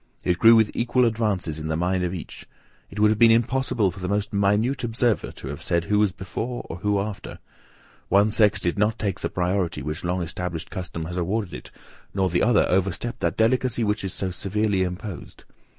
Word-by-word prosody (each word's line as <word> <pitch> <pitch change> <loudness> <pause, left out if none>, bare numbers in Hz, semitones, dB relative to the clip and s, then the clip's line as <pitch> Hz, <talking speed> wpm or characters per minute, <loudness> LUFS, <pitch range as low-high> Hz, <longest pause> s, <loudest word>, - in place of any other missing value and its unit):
It 90 -1 0
grew 115 0 +8
with 110 -2 +4
equal 125 +1 +2
advances 105 -9 -1
in 80 - -5
the 80 - -1
mind 90 +2 0
of 90 - -1
each. 90 -3 -8 0.4
It 105 - -8
would 105 0 +5
have 110 - -1
been 115 - +7
impossible 115 -3 +2
for - - -11
the 90 - -4
most 100 0 -1
minute 105 +7 +1
observer 115 -1 0
to - - -9
have 75 - -6
said 85 -1 0
who 105 +3 +1
was 105 -2 +3
before, 110 +6 -5
or 85 - -6
who 105 +2 0
after. 100 0 -5 0.7
One 100 +2 +4
sex 105 -1 +3
did 90 +3 -1
not 110 +2 +2
take 100 -4 -2
the - - -2
priority 90 -3 -1
which 75 +3 -4
long 90 +1 -1
established 85 0 -5
custom 85 -4 -5
has 90 +2 -5
awarded 95 +2 -2
it, - - -9 0.4
nor 95 -2 +1
the 85 - +1
other 115 0 +4
overstep 95 +6 -1
that - - -1
delicacy 120 +1 +2
which 105 -1 0
is 95 - -3
so 95 0 -3
severely 100 +2 0
imposed. 90 +1 -5
100 Hz, 205 wpm, -24 LUFS, 90-110 Hz, 0.7 s, grew